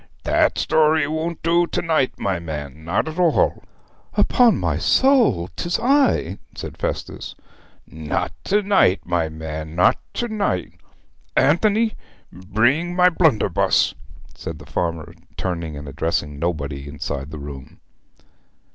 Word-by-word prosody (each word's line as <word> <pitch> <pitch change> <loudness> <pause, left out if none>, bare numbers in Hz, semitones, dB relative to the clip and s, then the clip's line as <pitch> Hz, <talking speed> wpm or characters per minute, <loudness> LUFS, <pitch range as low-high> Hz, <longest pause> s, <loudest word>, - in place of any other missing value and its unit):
That - - +2
story 155 -1 +3
won't 160 +2 -3
do 170 +1 +3
to - - -2
night, 155 -6 +1
my 95 -3 -1
man, 75 -2 -7
not 85 - 0
at 160 +3 -5
all.' 170 -3 +2 0.5
'Upon 245 -2 +4
my - - -1
soul 240 - +3
'tis 175 0 -1
I,' 260 - +2 0.2
said - - -7
Festus. - - -4 0.5
'Not 80 0 -3
to 205 +1 +2
night, 195 - +3
my 85 -2 0
man; 80 0 -6
not 90 - +4 0.2
to 240 - -1
night! 200 - -2 0.6
Anthony, 215 +8 +3 0.4
bring 120 - 0
my 180 0 +6
blunderbuss,' 135 - +2 0.4
said 80 - -7
the 70 - -13
farmer, 80 +1 -3 0.2
turning 85 -4 -3
and 70 0 -8
addressing 75 0 -2
nobody 75 -4 -3
inside 70 -1 -5
the 80 - -7
room. 70 -2 -9
90 Hz, 130 wpm, -21 LUFS, -, 0.6 s, my